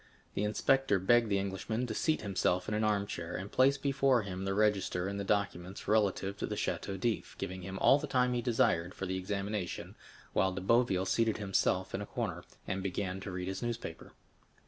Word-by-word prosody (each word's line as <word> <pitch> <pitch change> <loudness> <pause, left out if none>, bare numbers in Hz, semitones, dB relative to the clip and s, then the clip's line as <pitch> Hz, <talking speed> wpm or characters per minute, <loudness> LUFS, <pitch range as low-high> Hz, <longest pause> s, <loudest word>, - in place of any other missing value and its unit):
The 100 - -1
inspector 120 +2 +2
begged 115 +4 +4
the 100 - +2
Englishman 100 +5 -2
to 115 - -3
seat 155 +6 0
himself 90 -2 0
in 105 - -2
an 105 +1 +1
armchair, 100 -5 -1
and 95 +2 -5
placed 135 +1 +3
before 135 -4 +3
him 95 -1 -5
the 95 0 -1
register 100 -3 +1
and 100 0 -3
documents 100 -2 -1
relative 100 -2 +2
to - - -3
the - - -3
Château 95 -1 -2
d'If, 115 +1 -2
giving 95 0 -4
him 95 +1 -6
all 135 +8 +5
the 150 - -4
time 125 -2 +2
he 120 - 0
desired 95 -7 +1
for 95 - -4
the 95 0 -2
examination, 100 0 -3 0.4
while 95 0 +2
De 95 - -4
Boville 95 -3 +3
seated 115 +2 +2
himself 95 -2 0
in 100 - -2
a 100 - -5
corner, - - -3 0.2
and 95 - -2
began 95 0 -2
to 100 - -6
read 90 0 -4
his 95 - -3
newspaper. 120 -8 -5
100 Hz, 195 wpm, -32 LUFS, 95-115 Hz, 0.4 s, all